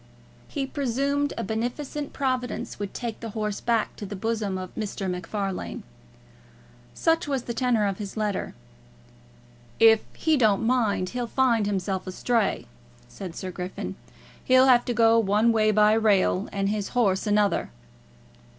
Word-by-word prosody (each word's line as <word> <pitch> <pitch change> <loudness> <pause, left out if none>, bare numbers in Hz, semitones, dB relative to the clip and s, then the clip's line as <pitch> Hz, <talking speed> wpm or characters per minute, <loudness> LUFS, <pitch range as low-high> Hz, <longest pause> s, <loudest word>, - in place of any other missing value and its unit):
He 275 - -3
presumed 280 +2 -1
a - - -2
beneficent 245 +7 -3
Providence 255 -5 -2
would 205 -1 -4
take 235 -3 -5
the 230 - -6
horse 210 -1 -2
back 230 -2 0
to 210 - -6
the 205 - -6
bosom 215 -1 -2
of 185 -1 -7
Mr. 205 -2 -4
MacFarlane. 185 +2 -4 1.1
Such 325 -2 +1
was 270 -4 -1
the 235 - -4
tenour 235 -3 +1
of 195 0 -2
his 205 0 -6
letter. 210 -3 -2 1.2
"If 225 -1 +7 0.2
he 315 -2 +2
don't 220 -4 +3
mind, 220 -7 +1
he'll 245 +1 -3
find 235 -4 +2
himself 190 -1 -2
astray," 225 +3 0 0.4
said 180 -4 -8
Sir 185 -1 -5
Griffin. 180 +1 -5 0.5
"He'll 255 0 +5
have 245 -2 +5
to 245 - -1
go 230 0 +5
one 215 +2 +3
way 215 -1 +3
by 210 0 +5
rail 210 -3 +2
and 195 -1 -1
his 210 +3 -3
horse 200 -3 +2
another." 210 -1 +2
220 Hz, 150 wpm, -25 LUFS, 200-245 Hz, 1.2 s, If